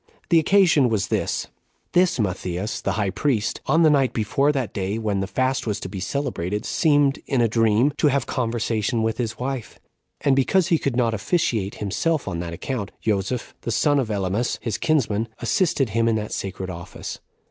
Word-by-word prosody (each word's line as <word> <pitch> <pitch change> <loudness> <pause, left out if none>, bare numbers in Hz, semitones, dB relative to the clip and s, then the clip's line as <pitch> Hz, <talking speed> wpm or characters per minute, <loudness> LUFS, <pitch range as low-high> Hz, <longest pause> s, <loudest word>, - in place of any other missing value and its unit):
The 170 - +6
occasion 160 -6 +4
was 105 -4 0
this: - - -1 0.5
This 180 -5 +3
Matthias 95 +1 -2
the 100 - -1
high 100 -2 0
priest, 120 -6 -1
on 160 +5 +4
the 155 - +6
night 135 -3 +2
before 135 +6 +1
that 130 -6 -2
day 100 +2 -2
when 105 -3 -1
the 95 - -2
fast 130 +3 0
was 105 -1 -1
to 95 - -5
be 95 0 -6
celebrated, 105 -3 -2
seemed, 145 -4 +2
in 135 - +1
a 120 - +4
dream, 115 +3 +3
7 - - -8
to - - +3
have 140 -3 +1
conversation 115 -2 -1
with 110 +1 -1
his 115 -2 -2
wife; 130 -2 -4 0.4
and 140 -2 +3
because 170 +7 +2
he 165 -4 +3
could 135 -4 -1
not 120 -2 +2
officiate 110 - 0
himself 150 - -1
on 85 - -3
that 85 -1 -4
account, 105 +4 -4
Joseph, 110 +3 -2
the - - -5
son 145 +5 +2
of 125 -5 -1
Ellemus, 100 +3 -1
his 115 -4 -3
kinsman, 115 -8 +1
assisted 150 - +1
him 115 +2 +1
in 115 - +3
that 105 -1 -3
sacred 95 -1 -4
office. 85 +1 -7
115 Hz, 190 wpm, -23 LUFS, 105-140 Hz, 0.5 s, The